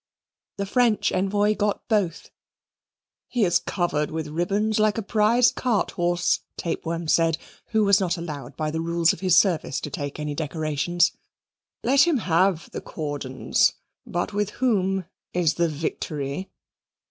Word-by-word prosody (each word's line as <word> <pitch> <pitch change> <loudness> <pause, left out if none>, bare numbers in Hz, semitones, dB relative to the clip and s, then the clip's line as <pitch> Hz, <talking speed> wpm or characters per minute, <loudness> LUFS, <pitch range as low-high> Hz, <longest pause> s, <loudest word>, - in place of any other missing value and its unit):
The 200 - -2
French 230 +1 +2
envoy 205 +2 +2
got 210 -1 -1
both. 200 -8 -1 1.0
"He 240 -5 +1
is 175 -1 +3
covered 150 -5 -1
with 160 -1 -4
ribbons 200 +7 0
like 215 0 +2
a 225 - -2
prize 225 +4 +3
cart 230 -7 0
horse," 175 0 +1 0.2
Tapeworm 165 0 -3
said, 165 0 +3 0.3
who 220 -1 +2
was 200 -1 +5
not 185 -2 0
allowed 150 -7 -7
by 155 -1 -1
the 160 +1 -2
rules 170 0 +2
of - - -9
his 185 -3 +3
service 170 -8 +2
to 150 - -5
take 145 +1 -5
any 150 -1 -3
decorations: 155 +2 0 0.7
"Let 275 +6 +5
him 330 -5 +3
have 180 -4 +1
the - - -5
cordons; 145 -4 0 0.3
but 175 +4 -3
with 205 0 0
whom 195 -7 +1 0.3
is 175 -3 +2
the 170 -1 +1
victory?" 150 +1 -4
175 Hz, 145 wpm, -24 LUFS, 155-205 Hz, 1.0 s, was